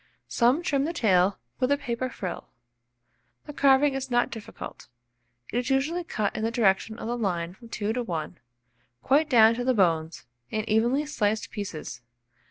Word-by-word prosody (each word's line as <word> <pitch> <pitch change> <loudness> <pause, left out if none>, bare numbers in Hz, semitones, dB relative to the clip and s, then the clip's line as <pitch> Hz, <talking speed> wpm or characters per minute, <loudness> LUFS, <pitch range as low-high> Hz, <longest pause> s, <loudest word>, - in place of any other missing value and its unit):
Some 255 +8 +2
trim 280 -4 +1
the 330 - -2
tail 195 - +3 0.2
with 255 +2 +1
a 285 - +4
paper 245 -1 -3
frill. 185 -7 -6 1.0
The 295 - -8
carving 280 0 +4
is 270 0 -4
not 240 -1 +1
difficult: 225 -2 -9 0.7
it 240 - +2
is 250 +2 -3
usually 295 +7 0
cut 215 - -2
in 220 - -3
the 225 - +1
direction 220 -1 +1
of - - -7
the 240 +2 -2
line 175 -7 -2
from 230 +4 -15
2 215 -1 -2
to 250 - -1
1, 170 -5 -4 0.6
quite 295 +3 +3
down 225 -3 +6
to 245 +1 -3
the 255 0 +2
bones, 165 -5 +1 0.2
in 215 +1 -3
evenly 240 +7 +2
sliced 220 -8 -1
pieces. 170 - -6
235 Hz, 175 wpm, -26 LUFS, 205-270 Hz, 1.0 s, down